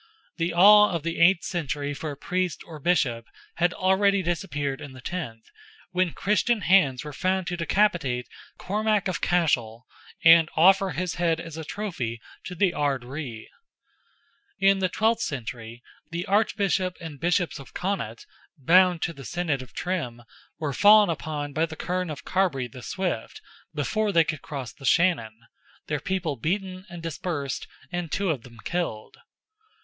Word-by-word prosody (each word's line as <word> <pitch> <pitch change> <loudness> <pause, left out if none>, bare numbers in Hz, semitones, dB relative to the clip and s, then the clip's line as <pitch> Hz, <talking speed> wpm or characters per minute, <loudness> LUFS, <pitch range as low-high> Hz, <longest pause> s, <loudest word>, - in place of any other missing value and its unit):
The 170 0 0
awe 210 +4 +7
of 170 -4 -3
the 165 0 -3
eighth 170 +1 +5
century 145 -4 -3
for 155 +2 -5
a 145 - -7
Priest 180 +2 -2
or 160 -3 -10
Bishop 135 -8 +1 0.3
had 175 +1 +3
already 190 +1 +2
disappeared 145 -6 -2
in 140 -2 -9
the 130 - -11
tenth, 120 -6 -5 0.5
when 180 -1 +1
Christian 210 +2 +1
hands 160 -9 +3
were 150 -1 -7
found 185 +5 0
to 175 - -2
decapitate 165 -8 +1 0.3
Cormac 210 0 0
of 185 - -3
Cashel, 125 -9 +1 0.4
and 165 -1 +8
offer 195 +4 +5
his 175 +2 -2
head 165 -2 +2
as 165 -2 -8
a 160 - -5
trophy 155 - -4 0.3
to 180 - -6
the 180 0 +2
Ard 140 -4 0
Righ. 125 -4 -7 1.1
In 195 0 +4
the 185 -1 +1
twelfth 220 +4 +1
century 120 - -5 0.3
the 170 +2 -4
Archbishop 195 -3 +1
and 160 -4 -8
Bishops 175 -1 0
of 140 - -13
Connaught, 180 - -3 0.3
bound 175 +4 +4
to 170 - -1
the 140 - -11
Synod 160 -2 -2
of 125 -3 -11
Trim, 125 -11 -3 0.3
were 150 -3 -3
fallen 210 +3 +6
upon 150 -2 -4
by 160 +3 +1
the 160 - -8
Kern 180 +2 -2
of 150 - -7
Carbre 175 -10 0
the 125 +2 -11
Swift, 190 +8 -3 0.4
before 215 -1 0
they 170 -3 +5
could 155 -3 -4
cross 135 -6 -6
the - - -17
Shannon, 130 -8 +2 0.4
their 150 -1 -2
people 170 -3 -2
beaten 185 - -3
and 170 -1 -9
dispersed 160 -4 -4 0.2
and 175 -3 -4
two 200 -3 0
of 140 -6 -3
them 120 -1 -15
killed. 165 -12 -3
170 Hz, 160 wpm, -26 LUFS, 140-185 Hz, 1.1 s, and